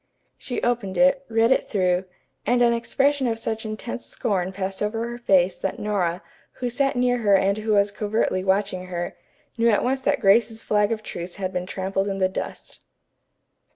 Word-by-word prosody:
She 245 - -5
opened 235 -6 -1
it, 275 0 +4
read 225 +1 +3
it - - +3
through, 185 -2 +1 0.4
and 245 0 +3
an 235 0 +4
expression 270 +3 +1
of 225 -1 -1
such 220 -1 -4
intense 215 +3 -5
scorn 190 -6 -2
passed 190 0 -4
over 225 +2 -1
her 240 0 -6
face 190 -5 +3
that 195 - -3
Nora, 185 -4 -1 0.3
who 245 -1 -3
sat 275 +3 +1
near 245 0 +2
her 205 -3 +4
and 195 +2 +2
who 215 0 0
was 200 0 +3
covertly 205 -3 -1
watching 190 -1 0
her, 175 -1 -4 0.4
knew 230 0 +4
at 210 - +3
once 265 +2 0
that - - +1
Grace's 225 +2 +3
flag 210 0 +2
of 220 -1 -2
truce 175 -3 -6
had 190 -2 -4
been 180 0 -3
trampled 195 +1 -2
in 195 -1 -2
the 190 -1 +3
dust. 185 - -7
210 Hz, 190 wpm, -24 LUFS, 190-235 Hz, 0.4 s, it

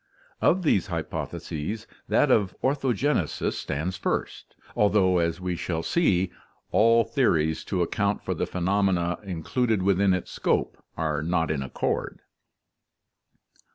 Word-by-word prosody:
Of 185 +1 +3
these 100 - +2
hypotheses 105 +9 -4 0.2
that 145 - +3
of 100 -6 +2
orthogenesis 135 - 0
stands 85 +6 -3
first, - - -3 0.2
although, 95 -3 +3
as 85 0 0
we 90 -1 -2
shall 80 -1 -3
see, 95 - +2 0.4
all 115 +1 +5
theories 80 - +1
to 90 -3 0
account 100 +3 -1
for - - 0
the - - -2
phenomena 90 -1 0
included 100 +4 -1
within 95 0 +3
its 90 - -5
scope - - -1
are 80 -2 -1
not 80 0 0
in 75 -3 -1
accord. 65 - -3
95 Hz, 120 wpm, -26 LUFS, 85-110 Hz, 0.4 s, all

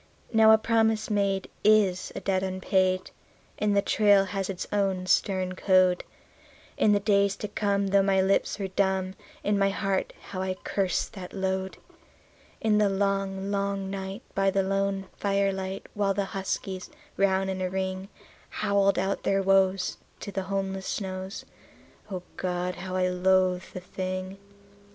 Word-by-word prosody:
Now 220 0 +6
a 220 - +8
promise 220 -1 +1
made 200 -2 +1 0.2
is 205 -4 +3
a - - -4
debt 190 -1 0
unpaid, 185 0 0 0.5
and 205 -1 +2
the 200 - +3
trail 205 -2 +4
has 195 0 -3
its 185 -2 -4
own 195 -3 0
stern 185 0 +1
code. 185 -1 +3 0.7
In 210 - +3
the 205 - +4
days 200 -1 +2
to 210 - -5
come, 200 -1 0
though 200 0 +5
my 195 0 +2
lips 190 +1 +2
were 195 -2 -3
dumb, 190 -1 0 0.3
in 205 -1 +1
my 195 0 +3
heart 195 -1 -1
how 185 -1 -6
I 190 0 -2
cursed 190 -1 -1
that 185 -4 -8
load. 190 -1 -2 0.8
In 215 -1 +3
the 210 -1 +4
long, 195 0 -1
long 200 -1 -1
night, 195 +3 -5
by 195 0 +2
the 195 0 +1
lone 195 0 -1
firelight, 195 -1 -1
while 200 -2 0
the 200 - 0
huskies, 190 -1 -4 0.3
round 190 -1 +2
in 190 0 -4
a 185 - 0
ring, 190 +1 -3 0.4
Howled 200 0 +1
out 190 +2 0
their 195 0 +1
woes 190 -1 +2 0.2
to 200 - -6
the 195 - -2
homeless 195 -1 -2
snows 190 -1 -4 0.6
O 185 -3 -5
God! 180 0 -2
how 185 +1 -6
I 185 0 +2
loathed 185 0 +2
the - - -6
thing. 185 +1 -5
195 Hz, 155 wpm, -27 LUFS, 185-200 Hz, 0.8 s, a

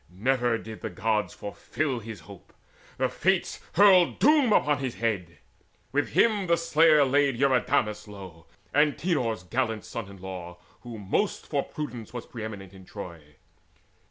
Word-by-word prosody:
Never 120 +5 +1
did 110 -1 -9
the 110 - -4
Gods 105 +3 -1
fulfil 130 +6 -3
His 110 -1 -9
hope: 100 -3 -14 0.4
the - - +2
Fates - - 0
hurled 185 -2 +6
doom 290 -4 +4
upon 150 -7 +3
his 130 -3 -3
head. 100 -8 -2 0.5
With 145 +2 -1
him 210 -5 +3
the 170 0 +3
slayer 160 -3 +4
laid 140 -1 +2
Eurydamas 120 -5 +1
low, 95 -5 -11 0.3
Antenor's 145 - +1
gallant 115 +3 -2
son 115 -4 -6
in 100 - -12
law, 90 -2 -8 0.2
who 120 -2 -9
most 105 - -1
For 145 -2 0
prudence 125 -8 -7
was 120 - -6
pre 115 -3 -8
eminent 100 -4 -7
in 95 -1 -13
Troy. 85 -6 -10
115 Hz, 150 wpm, -27 LUFS, 100-145 Hz, 0.5 s, hurled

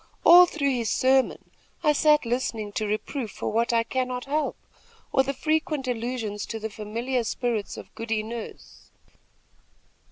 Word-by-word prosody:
All 355 +1 +9
through 280 -5 0
his 235 -3 -1
sermon, 260 +2 +2 0.3
I 300 -2 +4
sat 300 -1 +4
listening 230 -3 -2
to 215 +1 -2
reproof 220 +3 -3
for - - -4
what 230 +2 +1
I 230 -1 +3
cannot 250 +1 -2
help, 300 +2 -1 0.5
or 265 - +4
the 270 +1 -1
frequent 310 -1 -1
allusions 230 -3 -3
to 225 - -5
the 220 0 -5
familiar 230 +5 -2
spirits 230 -2 -2
of - - -11
Goody 225 -1 -2
Nurse." 230 +1 -9
245 Hz, 150 wpm, -26 LUFS, 225-275 Hz, 0.5 s, All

